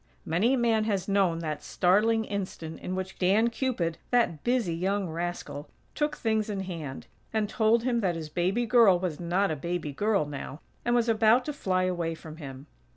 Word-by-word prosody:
Many 210 +11 +2
a - - -1
man 225 -3 +2
has 195 -4 -1
known 195 -4 +2
that 155 -2 -3
startling 220 +5 +2
instant 185 -6 -5
in 185 - -4
which 190 0 -5
Dan 210 +6 +3
Cupid, 225 -11 -1
that 235 -11 +1
busy 240 -8 +1
young 190 +3 -1
rascal, 165 -3 -5 0.2
took 300 0 -1
things 220 -2 0
in 200 -2 -2
hand, 165 -8 -6 0.3
and 215 -1 0
told 225 +2 +2
him 245 -2 +1
that 185 -6 0
his 160 -2 -5
baby 185 +9 0
girl 225 -5 +6
was 175 -4 -3
not 180 +2 +1
a - - -1
baby 165 -1 -3
girl 205 +1 +1
now, 145 0 -7 0.2
and 240 0 +1
was 240 -1 +2
about 225 +2 +4
to 300 - -3
fly 185 -9 0
away 175 -3 -1
from 160 -1 -11
him. 135 -3 -9
190 Hz, 190 wpm, -28 LUFS, 165-225 Hz, 0.3 s, girl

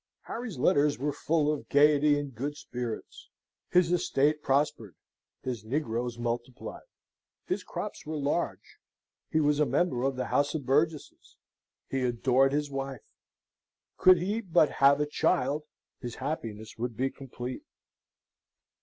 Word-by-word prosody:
Harry's 230 - -5
letters 145 +1 +3
were 145 +2 -1
full 150 +1 +1
of 150 - -7
gaiety 145 0 +5
and 145 -2 -4
good 145 +5 -4
spirits. 120 -5 -6 0.4
His 180 -1 +4
estate 150 -3 +2
prospered: 135 - 0 0.5
his 120 -5 -4
negroes 120 -1 -2
multiplied; 120 +1 -5 0.6
his - - -2
crops - - -6
were 155 0 -4
large; 140 - -2 0.5
he 160 - +2
was 150 -1 +2
a 150 - +4
member 135 -1 +1
of 135 0 0
our - - 0
House 145 +2 +1
of 145 -4 -3
Burgesses; 150 +3 -1 0.5
he 135 - -2
adored 130 +2 +3
his 145 0 -1
wife; 135 -1 -6 0.8
could 185 0 +7
he 200 +6 -1
but 165 -7 +3
have 140 +1 +6
a 150 - +2
child 150 0 +1 0.3
his 120 -2 -6
happiness 110 -7 -5
would 120 -2 -3
be 135 +1 0
complete. 130 -2 -7
140 Hz, 135 wpm, -29 LUFS, 125-150 Hz, 0.8 s, could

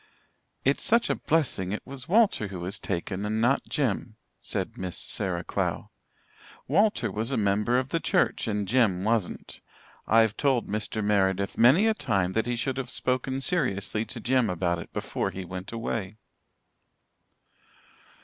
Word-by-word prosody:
"It's 140 +2 +2
such 235 +1 +3
a - - +1
blessing 130 - 0
it 105 - -4
was 135 0 -7
Walter 205 - +3
who 95 -2 -7
was 95 +3 -1
taken 95 +1 -3
and 105 +1 -1
not 120 +5 +1
Jem," 115 -5 -1 0.2
said - - -3
Miss 90 -1 -5
Sarah 90 -2 -2
Clow. - - -2 0.8
"Walter 160 - +2
was 110 +4 -2
a 135 - -1
member 105 +3 +2
of 130 +1 -1
the 165 - 0
church, - - +1
and 105 -2 -1
Jem 105 -5 +2
wasn't. 110 -3 -2 0.5
I've 110 -1 +4
told 135 -4 +1
Mr. 105 +1 -3
Meredith 100 -1 +1
many 135 - +6
a 220 - +4
time 95 - 0
that 110 +2 0
he 120 - 0
should 130 +2 -2
have 130 -2 -3
spoken 130 +1 -1
seriously 110 - 0
to 120 - -7
Jem 125 -1 +2
about 85 -1 0
it - - -9
before - - -2
he 95 -1 -6
went 90 +1 -7
away." 110 -3 -4
110 Hz, 160 wpm, -27 LUFS, 100-130 Hz, 0.8 s, many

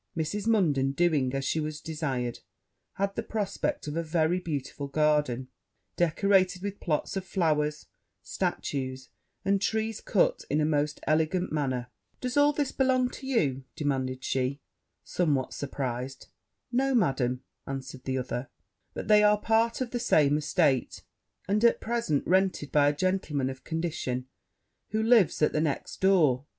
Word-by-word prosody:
Mrs. 200 +7 -2
Munden 145 -12 +2
doing 150 -5 +2
as 135 0 -2
she 160 - 0
was 155 0 -3
desired, 135 -7 -3 0.5
had 195 0 -1
the - - -1
prospect 210 -3 -2
of 150 - -4
a 165 - 0
very 165 +2 +1
beautiful 145 -4 -4
garden, 145 -4 +1 0.5
decorated 185 +2 +2
with 200 0 -4
plots 155 +1 -1
of 190 - -2
flowers, 155 -5 0 0.4
statues, 130 -2 -3 0.4
and 195 0 +2
trees 220 0 -1
cut - - +1
in 150 - +1
a 150 - +2
most 150 -1 0
elegant 160 +4 +1
manner. 130 -5 -2 0.3
'Does 250 -1 -3
all 290 0 +5
this 290 -2 -1
belong 255 -1 +2
to 265 - -9
you?' 140 - +1
demanded 130 -4 -2
she, 130 +2 -1 0.4
somewhat 145 -7 0
surprized. 135 -2 -4 0.4
'No, 265 +2 +2
Madam,' 130 - +1 0.2
answered 135 -1 -6
the 130 0 -1
other; 125 0 -4 0.5
'but - - -5
they 210 -1 +6
are 210 0 +4
part 225 +3 +1
of 245 -2 -2
the 245 - -2
same 150 -11 +3
estate, 150 -3 +1 0.4
and, 210 +3 +1
at 235 - +5
present, 230 -11 -1
rented 185 -5 +1
by 145 -1 +5
a 145 - -2
gentleman 150 -7 0
of 130 0 -11
condition, 155 -6 -3 0.6
who 220 +1 0
lives 225 -9 +4
at - - +3
the 155 - +1
next 150 -3 -2
door. 155 -9 +3
155 Hz, 150 wpm, -28 LUFS, 135-200 Hz, 0.6 s, they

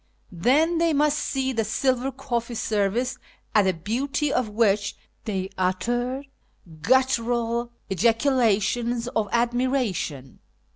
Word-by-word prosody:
Then 295 - +2
they 335 -1 +2
must 300 +1 +2
see 265 -1 -1
the 225 -2 0
silver 255 +4 0
cofCee 240 -3 -3
service, 225 +5 0 0.3
at 210 -2 +4
the 190 - +2
beauty 265 - -1
of 250 -4 0
which 210 -2 +1 0.3
they 190 -2 -3
uttered 240 +9 -1 0.6
guttural 235 - +1 0.2
ejaculations 230 - +1
of 220 -4 -1
admira 245 0 +1
tion. 135 -6 -6
235 Hz, 110 wpm, -24 LUFS, 210-260 Hz, 0.6 s, at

